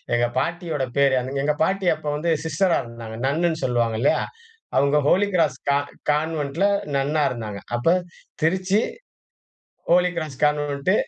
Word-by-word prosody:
எங்க 120 Hz, 0 st, +2 dB
பாட்டியோட 165 Hz, 0 st, -1 dB
பேரு. 140 Hz, -1 st, +4 dB, 0.3 s
எங்க 150 Hz, +1 st, +2 dB
பாட்டி 190 Hz, +2 st, 0 dB
அப்ப -, -, -9 dB
வந்து 160 Hz, +3 st, -1 dB
சிஸ்டரா 165 Hz, +3 st, +1 dB
இருந்தாங்க. 115 Hz, -2 st, -9 dB
நன்னுன்னு 165 Hz, +3 st, 0 dB
சொல்லுவாங்க 120 Hz, -3 st, 0 dB
இல்லயா. 140 Hz, -, +3 dB, 0.6 s
அவங்க 140 Hz, +1 st, +3 dB
ஹோலி 200 Hz, +6 st, +4 dB
கிராஸ் 155 Hz, -7 st, +2 dB
கா 140 Hz, -, +4 dB, 0.3 s
கான்வென்ட்ல 155 Hz, +3 st, 0 dB, 0.3 s
நன்னா 145 Hz, +3 st, +1 dB
இருந்தாங்க. 110 Hz, -4 st, -5 dB, 0.2 s
அப்போ 120 Hz, +8 st, +3 dB, 0.5 s
திருச்சி. 185 Hz, +5 st, +2 dB, 1.1 s
Holi 180 Hz, +1 st, +4 dB
cross 155 Hz, -5 st, -4 dB
convent, 145 Hz, +3 st, +1 dB
150 Hz, 130 wpm, -23 LUFS, 135-170 Hz, 1.1 s, பேரு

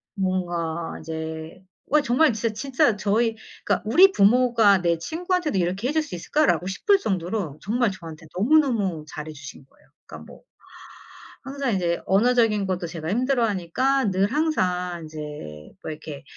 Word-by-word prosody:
뭔가 175 Hz, -4 st, -2 dB
이제 160 Hz, +2 st, -7 dB, 0.2 s
와 300 Hz, +1 st, +3 dB
정말 265 Hz, +1 st, +3 dB
진짜, 220 Hz, 0 st, -2 dB
진짜 270 Hz, -1 st, +1 dB
저희 220 Hz, +3 st, +1 dB, 0.3 s
그러니까 -, -, 0 dB
'우리 365 Hz, -, +7 dB
부모가 220 Hz, -, +4 dB
내 170 Hz, -1 st, +1 dB
친구한테도 345 Hz, -, -2 dB
이렇게 185 Hz, +7 st, -1 dB
해 -, -, 0 dB
줄 315 Hz, -1 st, +1 dB
수 185 Hz, -, -7 dB
있을까.'라고 230 Hz, -, +1 dB
싶을 390 Hz, -, +2 dB
정도로 180 Hz, -, -3 dB
정말 230 Hz, +1 st, +1 dB
저한테 165 Hz, -4 st, -10 dB
너무너무 220 Hz, -, +2 dB
잘해 155 Hz, +1 st, -7 dB
주신 140 Hz, -2 st, -11 dB
거예요. -, -, -28 dB, 0.2 s
그러니까 -, -, -11 dB
뭐 -, -, -15 dB, 1.0 s
항상 270 Hz, -4 st, -2 dB
이제 170 Hz, -2 st, 0 dB
언어적인 215 Hz, 0 st, +3 dB
것도 180 Hz, -2 st, -2 dB
제가 165 Hz, -1 st, -6 dB
힘들어하니까 240 Hz, 0 st, +1 dB
늘 195 Hz, +4 st, +1 dB
항상 180 Hz, -, 0 dB
인제 150 Hz, -, -8 dB
뭐 -, -, -5 dB
이렇게 150 Hz, -1 st, -8 dB
195 Hz, 335 characters per minute, -24 LUFS, 170-250 Hz, 1.0 s, 우리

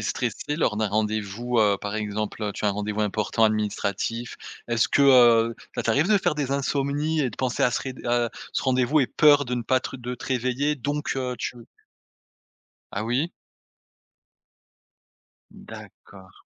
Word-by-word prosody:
stressé 150 Hz, -, -3 dB
lors 105 Hz, -, +1 dB
d'un 110 Hz, -1 st, +1 dB
rendez-vous, 110 Hz, +3 st, -1 dB
heu. 105 Hz, -2 st, +4 dB
Par 105 Hz, +1 st, -5 dB
exemple, 105 Hz, 0 st, -3 dB
heu, 105 Hz, -, -2 dB
tu -, -, -6 dB
as 105 Hz, -, +4 dB
un -, -, +2 dB
rendez-vous 105 Hz, +1 st, -2 dB
important 105 Hz, +2 st, +1 dB
administratif, 110 Hz, +2 st, -1 dB, 0.3 s
est-ce 115 Hz, -1 st, +2 dB
que, 140 Hz, -, +3 dB
heu, 120 Hz, -4 st, +6 dB, 0.2 s
ça -, -, -2 dB
t'arrive 140 Hz, -, +2 dB
de 215 Hz, -, +5 dB
faire 185 Hz, -5 st, +1 dB
des 145 Hz, -3 st, -2 dB
insomnies, 140 Hz, +3 st, 0 dB
et 135 Hz, -, +1 dB
de -, -, -12 dB
penser 130 Hz, -2 st, -1 dB
à 125 Hz, -, +4 dB
ce -, -, -2 dB
réd 130 Hz, -1 st, -6 dB
heu, -, -, -5 dB, 0.2 s
à 115 Hz, -, -7 dB, 0.2 s
ce -, -, -1 dB
rendez-vous, 130 Hz, +3 st, +2 dB
et 130 Hz, -, +2 dB
peur 145 Hz, -2 st, +5 dB
de 125 Hz, 0 st, -3 dB
ne 120 Hz, -, -2 dB
pas 130 Hz, +3 st, +2 dB
te 130 Hz, -, -6 dB
de 125 Hz, 0 st, -5 dB
te 120 Hz, -, -10 dB
réveiller, 130 Hz, +3 st, 0 dB
donc 145 Hz, +2 st, -2 dB
heu, 125 Hz, -1 st, -2 dB
tu 120 Hz, -, -4 dB, 1.4 s
Ah 100 Hz, -, -2 dB
oui. 130 Hz, +9 st, 0 dB, 2.2 s
D'accord. 95 Hz, -2 st, -13 dB
120 Hz, 175 wpm, -25 LUFS, 110-140 Hz, 2.2 s, heu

